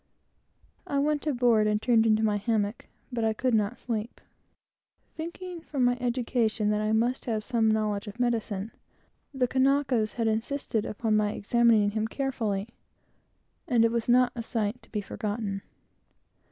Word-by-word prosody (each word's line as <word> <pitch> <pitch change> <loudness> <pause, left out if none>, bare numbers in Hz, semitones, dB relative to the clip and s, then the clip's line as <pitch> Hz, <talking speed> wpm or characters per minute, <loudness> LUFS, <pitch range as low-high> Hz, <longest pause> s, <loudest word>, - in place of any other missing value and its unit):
I 280 - -1
went 295 +1 0
aboard 240 -6 +3
and 210 0 +1
turned 225 -1 +3
into 220 0 +3
my 210 -1 +2
hammock, 210 +1 -1 0.3
but 235 -2 -1
I 220 0 +2
could 250 +3 0
not 210 -2 +1
sleep. 225 -1 -4 1.0
Thinking, 340 +2 -6
from 280 -5 -2
my 245 0 +3
education, 235 -3 0
that 210 0 0
I 215 0 0
must 235 +4 +1
have 220 -3 -1
some 225 -2 +1
knowledge 215 -1 0
of 205 +4 -9
medicine, 225 -4 -1 0.6
the 265 -3 0
Kanakas 260 -4 +2
had 230 - -1
insisted 225 0 -1
upon 215 0 0
my 210 0 +1
examining 220 -1 +3
him 215 +1 -1
carefully; 225 -6 -2 1.0
and 240 -6 +4
it 230 - +2
was 235 0 -2
not 250 +1 +5
a 235 - -3
sight 225 +1 -2
to 225 - -21
be 210 - -2
forgotten. 205 -1 -4
225 Hz, 155 wpm, -28 LUFS, 215-245 Hz, 1.0 s, not